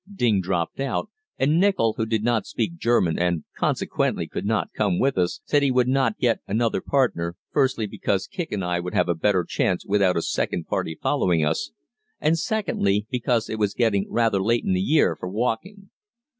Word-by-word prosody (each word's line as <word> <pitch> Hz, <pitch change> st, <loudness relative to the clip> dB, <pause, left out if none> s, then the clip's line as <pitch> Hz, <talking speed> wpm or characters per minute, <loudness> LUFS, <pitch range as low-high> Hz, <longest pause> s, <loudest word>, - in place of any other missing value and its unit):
Ding 115 Hz, -, +1 dB
dropped 90 Hz, +1 st, -2 dB
out; 135 Hz, -1 st, -2 dB, 0.3 s
and 150 Hz, +5 st, +2 dB
Nichol, 185 Hz, -, +3 dB
who 110 Hz, -, -2 dB
did 110 Hz, -1 st, 0 dB
not 115 Hz, -2 st, +1 dB
speak 170 Hz, 0 st, -3 dB
German 115 Hz, -, +2 dB
and 85 Hz, -2 st, 0 dB
consequently -, -, 0 dB
could -, -, -4 dB
not 110 Hz, -1 st, -1 dB
come 100 Hz, -5 st, 0 dB
with 135 Hz, 0 st, +1 dB
us, 90 Hz, -1 st, -1 dB
said 145 Hz, -, +2 dB
he 140 Hz, -, +2 dB
would 125 Hz, -1 st, +2 dB
not 135 Hz, +10 st, +1 dB
get 120 Hz, -2 st, +1 dB
another 115 Hz, +3 st, 0 dB
partner, 85 Hz, -12 st, 0 dB, 0.2 s
firstly, 130 Hz, -6 st, +1 dB
because 100 Hz, -1 st, -2 dB
Kicq 175 Hz, -3 st, -5 dB
and 95 Hz, -3 st, -2 dB
I 90 Hz, 0 st, 0 dB
would 90 Hz, +1 st, -5 dB
have -, -, +3 dB
a -, -, +3 dB
better 90 Hz, +2 st, +1 dB
chance 90 Hz, +2 st, -1 dB
without 95 Hz, -3 st, +2 dB
a 85 Hz, -, 0 dB
second 85 Hz, -, -2 dB
party 80 Hz, -, -3 dB
following 85 Hz, -4 st, +1 dB
us, 75 Hz, -4 st, -1 dB, 0.5 s
and, 155 Hz, +2 st, +2 dB
secondly, 105 Hz, -, 0 dB
because 120 Hz, -2 st, 0 dB
it 110 Hz, -, -4 dB
was 100 Hz, -1 st, 0 dB
getting 105 Hz, -5 st, +1 dB
rather 115 Hz, -4 st, +1 dB
late 115 Hz, +4 st, +1 dB
in -, -, +1 dB
the 90 Hz, -, +1 dB
year 150 Hz, +10 st, +3 dB
for 90 Hz, -, -6 dB
walking. 125 Hz, -, -3 dB
110 Hz, 195 wpm, -24 LUFS, 95-130 Hz, 0.5 s, Nichol